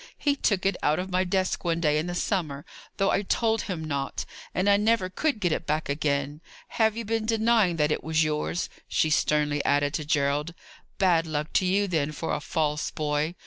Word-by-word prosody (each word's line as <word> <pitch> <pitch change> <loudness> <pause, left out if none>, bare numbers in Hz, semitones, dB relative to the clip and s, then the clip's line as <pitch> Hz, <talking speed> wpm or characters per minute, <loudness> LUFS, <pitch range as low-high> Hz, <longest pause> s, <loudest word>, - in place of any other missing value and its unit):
"He 285 -1 +1
took 200 -9 0
it 195 - +2
out 150 +1 +2
of 185 +1 -4
my 185 +1 +2
desk 185 0 -1
one 170 -1 0
day 150 -2 +2
in 160 - -3
the 175 - -3
summer, 155 -8 -2 0.3
though 195 - +2
I - - +2
told 225 +2 +1
him 175 -4 -4
not, 140 -2 -3 0.3
and 185 +2 0
I 200 - +6
never 210 -2 +1
could 290 +3 0
get 175 -4 +1
it 160 - -2
back 155 0 -1
again. 145 0 -1 0.3
Have 220 -1 +1
you 230 - -4
been 225 0 -1
denying 220 -5 +3
that 150 -1 +1
it - - -1
was 160 0 +2
yours?" 155 +3 -1 0.2
she 155 - +1
sternly 150 -1 +1
added 145 0 +2
to 155 - -2
Gerald. 145 +2 0 0.4
"Bad 170 -4 +3
luck 150 0 -3
to 185 - +2
you, 200 +2 +2
then, 155 -4 -1
for 160 +2 -3
a - - -1
false 150 -1 -1
boy. 150 +2 -1
165 Hz, 210 wpm, -26 LUFS, 150-195 Hz, 0.4 s, I